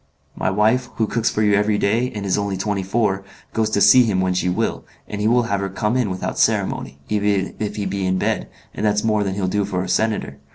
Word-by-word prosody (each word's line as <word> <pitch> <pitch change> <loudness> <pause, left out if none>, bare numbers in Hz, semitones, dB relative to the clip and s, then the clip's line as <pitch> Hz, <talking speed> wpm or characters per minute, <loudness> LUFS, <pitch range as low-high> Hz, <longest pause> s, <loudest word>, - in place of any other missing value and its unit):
My - - -1
wife, 110 +6 +2
who 110 - +1
cooks 115 +1 0
for 110 - 0
you 105 -1 +3
every 105 +1 +2
day, 115 +6 +1
and 100 -1 -4
is 95 - +1
only 100 -2 -2
twenty 100 +1 -1
four, 100 0 0 0.3
goes 110 -1 +1
to 105 - +1
see 130 - +8
him 105 -5 0
when 95 0 +1
she 90 0 0
will, 90 - -1 0.2
and 105 - -5
he 105 - +2
will 120 +2 +4
have 100 -4 -1
her 100 0 -2
come 105 +4 -1
in 125 -5 +1
without 95 0 -4
ceremony, - - 0
even 105 -2 0
if 105 -1 -3
he 105 - -3
be 95 0 -2
in 95 0 +1
bed, - - -1 0.2
and - - -5
that's 105 -1 +2
more 105 -2 +2
than 95 -1 -2
he'll 95 -2 -1
do 100 +2 0
for 95 -2 -2
a - - -5
senator. 110 +3 -1
105 Hz, 250 wpm, -21 LUFS, 95-110 Hz, 0.3 s, see